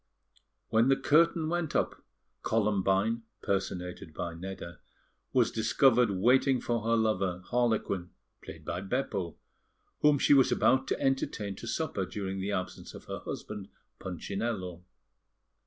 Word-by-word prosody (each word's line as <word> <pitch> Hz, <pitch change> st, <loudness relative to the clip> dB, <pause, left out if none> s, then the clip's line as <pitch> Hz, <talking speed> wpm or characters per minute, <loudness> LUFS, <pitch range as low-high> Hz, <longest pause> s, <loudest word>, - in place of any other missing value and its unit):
When 115 Hz, +2 st, +4 dB
the 135 Hz, -, +5 dB
curtain 160 Hz, +3 st, +3 dB
went 170 Hz, -1 st, -2 dB
up -, -, 0 dB, 0.4 s
Columbine 105 Hz, +1 st, +1 dB, 0.2 s
(personated 90 Hz, -4 st, -3 dB
by 85 Hz, -1 st, -3 dB
Nedda) 85 Hz, -1 st, -7 dB, 0.5 s
was 125 Hz, -3 st, +3 dB
discovered 120 Hz, +1 st, +4 dB
waiting 125 Hz, +7 st, +3 dB
for 120 Hz, -1 st, -1 dB
her 115 Hz, +2 st, +2 dB
lover, 100 Hz, -5 st, 0 dB
Harlequin 110 Hz, -7 st, 0 dB, 0.3 s
(played -, -, -10 dB
by 90 Hz, -, -3 dB
Beppo), 100 Hz, -5 st, -2 dB, 0.6 s
whom 150 Hz, -1 st, +5 dB
she 140 Hz, -, +4 dB
was 135 Hz, -2 st, +5 dB
about 130 Hz, 0 st, +3 dB
to -, -, -1 dB
entertain 110 Hz, -7 st, -1 dB
to 115 Hz, -, -8 dB
supper 140 Hz, -7 st, -1 dB
during 95 Hz, -2 st, -4 dB
the 100 Hz, +2 st, -2 dB
absence 90 Hz, -2 st, -4 dB
of -, -, -11 dB
her -, -, -5 dB
husband, 105 Hz, -2 st, -6 dB, 0.3 s
Punchinello. 95 Hz, -1 st, -4 dB
110 Hz, 130 wpm, -30 LUFS, 95-125 Hz, 0.6 s, the